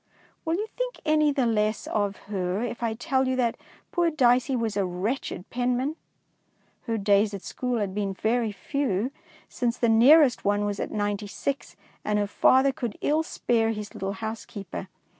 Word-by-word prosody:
Will 325 +1 +1
you 415 +4 -1
think - - -3
any 305 -1 +4
the 275 -3 +1
less 215 -1 +1
of 205 -1 -1
her 195 +1 -2
if 240 0 -4
I 230 -2 -1
tell 265 +1 0
you 260 - +1
that 240 -3 +1 0.4
poor 345 -1 +2
Dicey 255 -3 +3
was 225 -3 -1
a 200 - +1
wretched 185 +2 -3
penman? 250 +4 0 0.9
Her 225 -1 0
days 205 0 +3
at 195 - -8
school 250 -1 -2
had 200 -3 -2
been 200 -1 -2
very 225 +2 0
few, 250 -1 -1 0.4
since 240 -1 -1
the 235 - +2
nearest 255 +4 +6
one 205 +1 +1
was 205 -1 -2
at - - -2
Ninety 205 0 -2
six, 205 -4 -4 0.3
and 210 0 0
her 205 - +2
father 260 +6 +4
could 240 -5 -5
ill 305 +2 +2
spare 230 -7 0
his 210 -1 -7
little 195 +1 -3
housekeeper. 205 -3 -6
225 Hz, 175 wpm, -26 LUFS, 205-260 Hz, 0.9 s, nearest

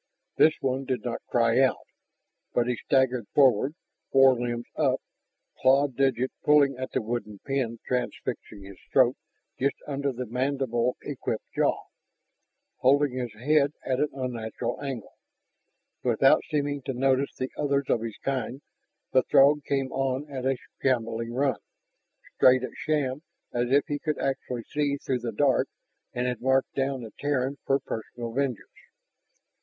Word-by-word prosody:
This 155 0 +5
one 135 0 -1
did 130 -2 -2
not 120 -1 -3
cry 115 0 +3
out. 135 -1 +2 0.7
But 120 - +3
he 125 0 0
staggered 125 -2 +1
forward, 135 +1 +4 0.4
forelimbs 120 -3 +4
up, - - +2 0.6
clawed 135 0 +4
digits 130 -1 +1
pulling 145 -2 +5
at 130 +1 -5
the - - 0
wooden 110 -2 -4
pin 130 -4 -1
transfixing 120 -4 -3
his 95 -1 -12
throat 130 -1 +5 0.4
just 140 +2 +1
under 140 -1 -1
the 125 0 -5
mandible 125 0 0
equipped - - -4
jaw, - - +1 1.0
holding 140 +2 +4
his 125 -2 -3
head 145 +4 +2
at 130 -1 0
an 150 - +2
unnatural 120 -2 -4
angle. 135 -6 -5 0.9
Without - - +4
seeming 145 -1 -1
to 135 - -4
notice 135 +2 +1
the 130 - -4
others 140 -1 0
of 115 - +1
his 115 -2 -5
kind, 135 0 -2 0.5
the 130 - +5
Throg 145 +3 +5
came 135 -2 -1
on 135 +2 -1
at 130 -1 -3
a 135 -1 +1 0.2
shambling 115 -3 0
run, 135 0 0 0.8
straight 130 0 +6
at 130 - -5
Shann 145 -3 -1 0.3
as 120 0 0
if 140 +1 +5
he 145 -3 -3
could 155 0 -2
actually 135 -3 -2
see 145 +1 -1
through 130 -2 -2
the 120 -1 -3
dark 135 +4 +2 0.4
and 125 0 -2
had 125 -2 -2
marked 130 +1 +2
down 135 -2 -1
the 110 - -9
Terran 140 -1 -1
for 135 - +4
personal 115 -1 -6
vengeance. 130 -4 -1
130 Hz, 150 wpm, -27 LUFS, 120-140 Hz, 1.0 s, straight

